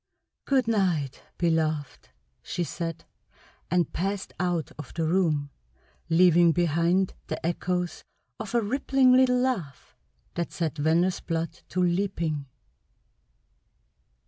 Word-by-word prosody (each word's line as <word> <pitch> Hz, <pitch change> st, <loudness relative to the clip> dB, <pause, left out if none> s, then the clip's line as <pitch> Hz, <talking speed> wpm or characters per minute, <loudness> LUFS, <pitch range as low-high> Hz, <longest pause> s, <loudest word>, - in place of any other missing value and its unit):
"Good 265 Hz, -4 st, +2 dB
night, 180 Hz, -, 0 dB, 0.2 s
beloved!" 155 Hz, -5 st, -1 dB, 0.3 s
she 175 Hz, -, -3 dB
said, 165 Hz, -1 st, -5 dB, 0.6 s
and 175 Hz, -2 st, +1 dB
passed 195 Hz, +3 st, -2 dB
out 175 Hz, -3 st, -1 dB
of 150 Hz, -, -9 dB
the 165 Hz, -1 st, 0 dB
room, 155 Hz, -5 st, +1 dB, 0.6 s
leaving 170 Hz, 0 st, +5 dB
behind 175 Hz, +3 st, +2 dB
the -, -, -4 dB
echoes 180 Hz, +1 st, -2 dB, 0.4 s
of 220 Hz, +2 st, -5 dB
a 235 Hz, -, +4 dB
rippling 265 Hz, +3 st, +3 dB
little 255 Hz, -1 st, +5 dB
laugh 230 Hz, -, -2 dB, 0.4 s
that 170 Hz, -1 st, -3 dB
set 160 Hz, -3 st, -2 dB
Venner's 170 Hz, +5 st, +2 dB
blood 165 Hz, 0 st, -2 dB, 0.2 s
to 185 Hz, -, -1 dB
leaping. 170 Hz, -5 st, -1 dB
175 Hz, 110 wpm, -27 LUFS, 160-190 Hz, 0.6 s, leaving